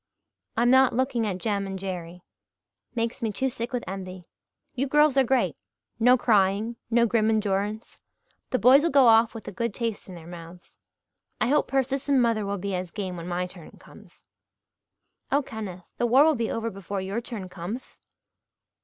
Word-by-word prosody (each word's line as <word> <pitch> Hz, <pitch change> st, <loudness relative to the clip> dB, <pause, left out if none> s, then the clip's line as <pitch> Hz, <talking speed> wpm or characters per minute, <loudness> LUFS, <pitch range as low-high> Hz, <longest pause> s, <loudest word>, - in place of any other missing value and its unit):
I'm 240 Hz, +1 st, +4 dB
not 260 Hz, -1 st, +5 dB
looking 255 Hz, -3 st, 0 dB
at 190 Hz, -3 st, -2 dB
Jem 200 Hz, 0 st, -2 dB
and 195 Hz, 0 st, -5 dB
Jerry 180 Hz, -2 st, -6 dB, 0.7 s
makes 230 Hz, 0 st, -2 dB
me 225 Hz, -2 st, -1 dB
too 265 Hz, +5 st, -1 dB
sick 235 Hz, 0 st, -5 dB
with 245 Hz, -2 st, -2 dB
envy. 185 Hz, -1 st, -7 dB, 0.5 s
You 270 Hz, 0 st, -1 dB
girls 295 Hz, 0 st, +4 dB
are 270 Hz, -, +5 dB
great 240 Hz, -, +1 dB, 0.4 s
no 250 Hz, +2 st, +6 dB
crying, 210 Hz, 0 st, +2 dB
no 235 Hz, 0 st, +4 dB
grim 220 Hz, -1 st, +2 dB
endurance. 210 Hz, 0 st, -1 dB, 0.5 s
The 255 Hz, -, +1 dB
boys'll 270 Hz, -, +6 dB
go 275 Hz, -3 st, +5 dB
off 225 Hz, 0 st, +5 dB
with 225 Hz, -, -9 dB
a -, -, -4 dB
good 235 Hz, +2 st, -3 dB
taste 230 Hz, -5 st, -4 dB
in 185 Hz, -, -8 dB
their 165 Hz, -2 st, -11 dB
mouths. 170 Hz, 0 st, -12 dB, 0.6 s
I -, -, +1 dB
hope 295 Hz, -, +2 dB
Persis 270 Hz, +1 st, -1 dB
and 275 Hz, -2 st, +4 dB
mother 230 Hz, -4 st, +1 dB
will 200 Hz, 0 st, -2 dB
be 200 Hz, +1 st, -4 dB
as 180 Hz, -1 st, -3 dB
game 190 Hz, -2 st, -5 dB
when 170 Hz, 0 st, -7 dB
my 180 Hz, 0 st, -1 dB
turn 180 Hz, -3 st, -13 dB
comes." -, -, -18 dB, 1.0 s
"Oh, 285 Hz, +1 st, +2 dB
Kenneth 195 Hz, -7 st, -7 dB
the 240 Hz, -, +2 dB
war 260 Hz, +5 st, +6 dB
will 315 Hz, 0 st, +4 dB
be 230 Hz, -5 st, -2 dB
over 230 Hz, 0 st, -2 dB
before 195 Hz, +1 st, -5 dB
your 195 Hz, +5 st, -3 dB
turn 225 Hz, -6 st, -6 dB
cometh." 185 Hz, +7 st, -8 dB
220 Hz, 180 wpm, -26 LUFS, 190-245 Hz, 1.0 s, no